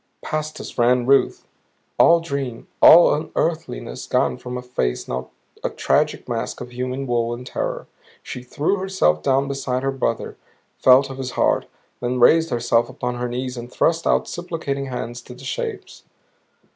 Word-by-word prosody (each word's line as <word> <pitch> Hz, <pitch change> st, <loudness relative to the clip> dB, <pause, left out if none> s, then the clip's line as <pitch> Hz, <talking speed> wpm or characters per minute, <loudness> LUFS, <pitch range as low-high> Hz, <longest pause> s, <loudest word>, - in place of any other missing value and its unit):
Past 155 Hz, 0 st, -3 dB
us -, -, -8 dB
ran 120 Hz, +1 st, +3 dB
Ruth, 135 Hz, +2 st, +2 dB, 0.5 s
all 170 Hz, 0 st, +6 dB
dream, 140 Hz, -7 st, -4 dB
all 170 Hz, +2 st, +9 dB
unearthliness 150 Hz, -, -3 dB
gone 65 Hz, -, +1 dB
from 125 Hz, -, -6 dB
a 125 Hz, -, -6 dB
face 65 Hz, -, -2 dB
now 65 Hz, +1 st, -4 dB, 0.3 s
a -, -, 0 dB
tragic -, -, 0 dB
mask -, -, -3 dB
of 125 Hz, 0 st, -8 dB
human 130 Hz, +2 st, -3 dB
woe 120 Hz, -2 st, 0 dB
and 125 Hz, +1 st, -7 dB
terror. -, -, -3 dB, 0.4 s
She 125 Hz, -, -7 dB
threw 150 Hz, +9 st, -1 dB
herself 185 Hz, -, +1 dB
down 135 Hz, -, +2 dB
beside 135 Hz, -2 st, -2 dB
her 135 Hz, -, +1 dB
brother, 125 Hz, -4 st, -2 dB, 0.4 s
felt 135 Hz, +1 st, +5 dB
of 135 Hz, -, -8 dB
his 130 Hz, -1 st, -4 dB
heart; -, -, +2 dB, 0.3 s
then 125 Hz, +1 st, -2 dB
raised 160 Hz, +6 st, +5 dB
herself 120 Hz, -1 st, +1 dB
upon 125 Hz, 0 st, -3 dB
her 125 Hz, 0 st, -2 dB
knees 125 Hz, +1 st, -4 dB
and 120 Hz, +1 st, -8 dB
thrust 165 Hz, +4 st, +1 dB
out -, -, +2 dB
supplicating 160 Hz, -6 st, -4 dB
hands 120 Hz, -1 st, -5 dB
to 125 Hz, -, -12 dB
the 125 Hz, -, -14 dB
shapes. 130 Hz, -, -5 dB
125 Hz, 165 wpm, -22 LUFS, 120-140 Hz, 0.5 s, all